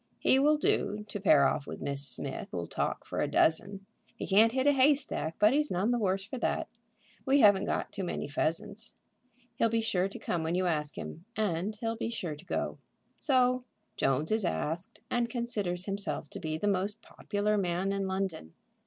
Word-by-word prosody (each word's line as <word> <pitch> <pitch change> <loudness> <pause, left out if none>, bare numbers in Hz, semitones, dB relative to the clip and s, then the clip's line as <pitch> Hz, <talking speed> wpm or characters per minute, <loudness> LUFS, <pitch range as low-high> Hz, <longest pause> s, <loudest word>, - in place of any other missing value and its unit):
He 265 - +3
will 300 +2 +4
do 210 -7 0
to 205 - -4
pair 155 -8 +5
off 145 -2 -2
with - - -6
Miss 140 0 -2
Smith, 135 0 -2
who'll 85 -2 -4
talk - - -2
for - - -3
a - - +1
dozen. 195 +5 +2 0.3
He - - -5
can't 215 +4 +5
hit 260 +2 0
a 290 - +6
hay 280 +1 +5
stack, 165 - -1
but 210 +4 +5
he's 300 +1 +2
none 190 +6 +1
the 240 - +1
worse 195 -2 0
for 245 +4 -6
that. - - -1 0.6
We 275 +1 +4
haven't 200 -2 +6
got - - -2
too 195 - -4
many 175 - -3
pheasants. 200 +9 -2 0.6
He'll 230 - +3
be 230 +1 +1
sure 195 -4 +1
to - - -8
come 170 - -2
when 160 +2 -1
you 185 0 +1
ask 150 -4 -1
him, 165 +3 -7
and 205 0 -1
he'll 225 +1 -3
be 225 - -2
sure 175 -9 -4
to 150 - -15
go." - - -2 0.4
So 255 -2 +3 0.3
Jones 135 +6 +1
is 220 -1 +2
asked, 165 - -2
and 240 -1 +1
considers 205 -8 -1
himself 200 -5 -2
to - - -6
be 155 0 -3
the 205 - -1
most 200 +2 -1
popular 210 0 -1
man 185 0 0
in 195 -1 -1
London. 190 - -3
195 Hz, 200 wpm, -30 LUFS, 170-225 Hz, 0.6 s, a